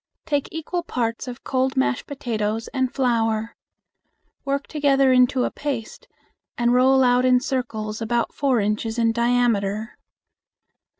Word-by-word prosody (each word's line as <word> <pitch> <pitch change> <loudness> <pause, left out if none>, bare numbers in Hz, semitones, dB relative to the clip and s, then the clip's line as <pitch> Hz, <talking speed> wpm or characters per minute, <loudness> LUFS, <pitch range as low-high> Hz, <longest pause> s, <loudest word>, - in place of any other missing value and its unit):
Take 290 -2 -1
equal 325 +2 -3
parts 240 -5 -3
of 250 0 -8
cold 260 0 -1
mashed 125 -1 0
potatoes 225 -5 -3
and 260 -2 -1
flour. 225 -4 0 0.9
Work 275 0 -2
together 275 -3 +2
into 250 0 +3
a - - -1
paste 270 -7 -5 0.5
and 240 0 +2
roll 265 +1 +5
out 250 0 +3
in 255 -1 +4
circles 230 -5 -3
about 235 +1 -1
four 270 -4 +1
inches 215 +2 -1
in 230 -1 +3
diameter. 230 -3 0
245 Hz, 130 wpm, -23 LUFS, 225-265 Hz, 0.9 s, roll